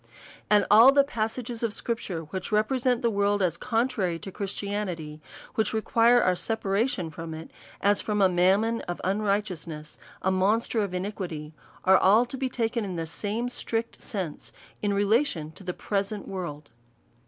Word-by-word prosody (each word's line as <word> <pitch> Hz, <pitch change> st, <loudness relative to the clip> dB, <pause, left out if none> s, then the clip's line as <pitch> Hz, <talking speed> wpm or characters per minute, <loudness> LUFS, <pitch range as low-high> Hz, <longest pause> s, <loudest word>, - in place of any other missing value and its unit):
And 210 Hz, -1 st, +5 dB
all 225 Hz, +6 st, +9 dB
the 280 Hz, 0 st, +5 dB
passages 235 Hz, -1 st, -3 dB
of 230 Hz, -3 st, -1 dB
scripture^ 195 Hz, -11 st, -3 dB
which 190 Hz, +3 st, -4 dB
represent 245 Hz, +3 st, +1 dB
the 235 Hz, -, +3 dB
world 205 Hz, -1 st, +1 dB
as 170 Hz, -3 st, +1 dB
contrary 225 Hz, -6 st, 0 dB
to 195 Hz, -, -8 dB
Christianity, 195 Hz, -6 st, -4 dB, 0.3 s
which 220 Hz, -, 0 dB
require 230 Hz, +2 st, +4 dB
our 185 Hz, 0 st, +3 dB
separation 200 Hz, -3 st, 0 dB
from 160 Hz, +1 st, -7 dB
it, 160 Hz, +1 st, -9 dB, 0.3 s
as 205 Hz, 0 st, +3 dB
from 210 Hz, -1 st, -1 dB
a 195 Hz, -, +6 dB
mammon 195 Hz, +6 st, +2 dB
of 175 Hz, -, -4 dB
unrigh 200 Hz, +2 st, +1 dB
teousness, 160 Hz, -6 st, -7 dB, 0.3 s
a 190 Hz, -, +2 dB
monster 210 Hz, +4 st, +1 dB
of 195 Hz, -3 st, -2 dB
iniquity, 180 Hz, -6 st, -5 dB, 0.3 s
are 190 Hz, 0 st, +6 dB
all 215 Hz, +6 st, +5 dB
to 245 Hz, -, -7 dB
be 265 Hz, -1 st, -1 dB
taken 235 Hz, -1 st, -1 dB
in 190 Hz, -3 st, -4 dB
the 165 Hz, -1 st, -2 dB
same 210 Hz, +8 st, -2 dB
strict 230 Hz, -2 st, -3 dB
sense, 185 Hz, -8 st, -5 dB, 0.3 s
in 205 Hz, -, +1 dB
relation 200 Hz, -, +1 dB
to 175 Hz, -, -12 dB
the 180 Hz, -, -2 dB
present 200 Hz, +2 st, -3 dB
world. 170 Hz, -6 st, -6 dB
205 Hz, 165 wpm, -27 LUFS, 180-225 Hz, 0.3 s, all